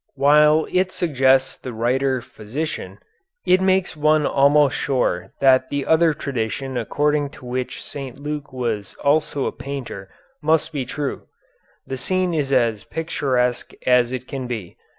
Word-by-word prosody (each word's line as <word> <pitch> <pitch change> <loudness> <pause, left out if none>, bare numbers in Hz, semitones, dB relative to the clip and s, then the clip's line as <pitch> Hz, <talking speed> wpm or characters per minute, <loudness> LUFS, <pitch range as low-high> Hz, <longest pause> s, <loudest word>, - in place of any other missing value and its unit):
While 150 +3 +5
it 185 0 +1
suggests 135 -6 +2
the 125 - -7
writer 130 +3 0
physician 110 -4 -5 0.5
it 185 +1 +4
makes 190 -1 +2
one 155 0 +3
almost 140 0 +4
sure 125 -10 -1
that 130 -1 +4
the 140 -1 -2
other 160 0 +4
tradition 130 0 -3
according 145 +5 0
to 130 - -13
which 125 +1 -4
St. 135 -2 -7
Luke 150 0 -5
was 115 -6 -3
also 145 -1 +1
a - - -1
painter 125 -9 -7 0.3
must 160 +1 +1
be 135 -3 -2
true. 145 -2 -4 0.6
The 135 - -5
scene 185 +5 0
is 145 -4 -1
as 115 -5 +2
picturesque 130 -6 -1
as 125 -1 +4
it 130 0 -5
can 130 -2 -5
be. 110 -8 -5
135 Hz, 145 wpm, -22 LUFS, 125-150 Hz, 0.6 s, While